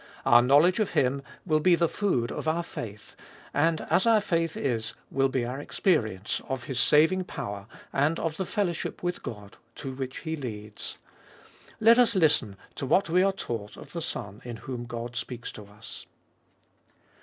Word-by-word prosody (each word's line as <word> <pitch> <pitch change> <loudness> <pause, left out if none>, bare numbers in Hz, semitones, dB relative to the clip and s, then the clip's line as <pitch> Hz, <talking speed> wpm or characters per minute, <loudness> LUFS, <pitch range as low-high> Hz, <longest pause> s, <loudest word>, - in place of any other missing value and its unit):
Our 120 0 +7
knowledge 145 - +5
of 215 - 0
Him 140 -3 +2 0.2
will 155 -3 +3
be 175 +3 +5
the 170 0 +2
food 130 - 0
of - - -4
our 165 +2 +1
faith, 105 -9 -8 0.4
and 160 +2 +2
as 190 - +4
our 225 -1 +6
faith 165 -5 0
is 115 -3 -1 0.2
will 135 0 +2
be 130 -2 0
our 125 +3 -4
experience 110 - 0
of 130 -2 -2
His 130 -3 -2
saving 160 +7 +4
power, 100 - -6 0.3
and 150 +4 +2
of 160 -1 -2
the 190 - -2
fellowship 185 -6 -2
with 175 0 -2
God 105 -6 -8 0.2
to 135 -2 -6
which 130 -1 -5
He 160 0 -3
leads. 105 -7 -6 0.8
Let 230 +2 +7
us 235 -3 +4
listen 150 - +3 0.2
to 135 - -3
what 185 +6 +3
we 180 +2 +5
are 195 +1 +4
taught 115 - -5
of - - -12
the 170 - -3
Son 100 - -5
in 120 -1 -6
whom 125 -2 -4
God 120 0 -5
speaks 120 0 -5
to 105 - -10
us. 105 +3 -11
140 Hz, 180 wpm, -28 LUFS, 120-170 Hz, 0.8 s, Our